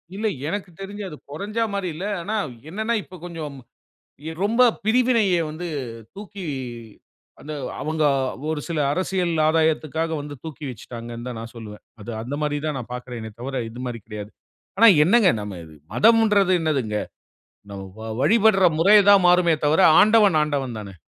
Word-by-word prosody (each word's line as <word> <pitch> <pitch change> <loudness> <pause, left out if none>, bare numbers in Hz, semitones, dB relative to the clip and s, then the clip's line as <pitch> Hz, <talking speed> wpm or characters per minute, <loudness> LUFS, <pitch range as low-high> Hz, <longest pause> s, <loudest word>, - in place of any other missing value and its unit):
இல்ல, 215 +2 -1 0.2
எனக்கு 195 +2 -4
தெரிஞ்சு, 205 +1 -6
அது 150 - -10
கொறஞ்சா 210 +9 -2
மாரி 195 -3 -2
இல்ல. 185 +5 -5 0.2
ஆனா, 210 +5 -3 0.3
என்னான்னா, 220 +5 -1
இப்போ 185 - -14
கொஞ்சம் 155 -5 -7 0.7
எ - - -3
ரொம்ப 230 +4 +3 0.2
பிரிவினைய 230 -3 +3 0.2
வந்து 165 +3 -6 0.5
தூக்கி 200 -1 -9 1.0
அந்த 155 - -8 0.3
அவுங்க 155 0 -1 0.5
ஒரு 155 -2 -2
சில 165 -2 -2
அரசியல் 180 -1 -1
ஆதாயத்துக்காக 160 0 +1
வந்து 145 0 -7
தூக்கி 155 -1 -8
வெச்சுட்டாங்கன்னு 120 0 -8
தான், 125 - -6
நான் 115 +1 -9
சொல்லுவேன். 105 -2 -10 0.2
அது 110 +3 -8
அந்த 125 +5 -5
மாரி 145 0 0
தான், 150 -2 -2
நான் 120 -2 -8
பாக்கிறேனே 120 -3 -7
தவிர 130 0 -3
இது 120 - -10
மாரி 120 -1 -4
கிடையாது. 105 -1 -7 0.5
ஆனா 230 - +8 0.2
என்னங்க? 205 +3 +5
நம்ம 105 -1 -6
இது 80 -1 -15 0.2
மதம்ன்றது 210 -4 +4
என்னாதுங்க? 135 -10 -1 0.7
நம்ம 100 -1 -7 0.2
வ - - -9 0.2
வழிபட்ற 215 -2 +4
முறை 200 +6 +6
தான் 200 -2 +7
மாறுமே 175 -1 +4
தவிர, 150 +4 +3 0.2
ஆண்டவன், 210 -4 +5
ஆண்டவன் 135 -6 -2
தானே. 100 -2 -9
160 Hz, 155 wpm, -23 LUFS, 125-200 Hz, 1.0 s, ஆனா